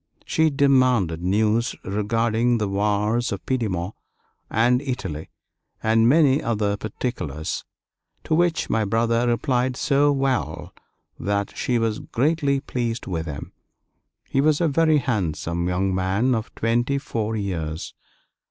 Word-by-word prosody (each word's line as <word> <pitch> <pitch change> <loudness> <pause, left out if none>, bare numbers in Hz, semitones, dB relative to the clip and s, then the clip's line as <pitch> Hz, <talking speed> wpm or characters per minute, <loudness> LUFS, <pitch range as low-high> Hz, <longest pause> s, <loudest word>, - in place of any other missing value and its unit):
She 160 0 +2
demanded 130 - +3
news 110 +5 +1
regarding 115 +4 +1
the 105 -2 -1
wars 105 +4 0
of 100 - -5
Piedmont 105 -7 -1 0.6
and 120 +3 +3
Italy, 95 - -4 0.5
and 115 +1 +4
many 145 -1 +4
other 105 -3 0
particulars, 100 - -4 0.6
to - - -2
which 170 0 +2
my 110 0 +1
brother 115 +3 +1
replied 125 +2 0
so 145 0 +3
well 135 - -1 0.5
that 100 0 -2
she 125 - 0
was 115 -2 0
greatly 140 +1 0
pleased 120 -3 -3
with 85 -3 -3
him. 75 -1 -7 0.7
He 135 - +1
was 150 0 +3
a 170 - +2
very 155 +1 +3
handsome 85 - -1
young 95 +2 0
man 95 +7 +1
of 110 -2 -2
twenty 120 +4 +1
four 115 -5 -3
years. 85 -6 -4
115 Hz, 125 wpm, -23 LUFS, 100-130 Hz, 0.7 s, and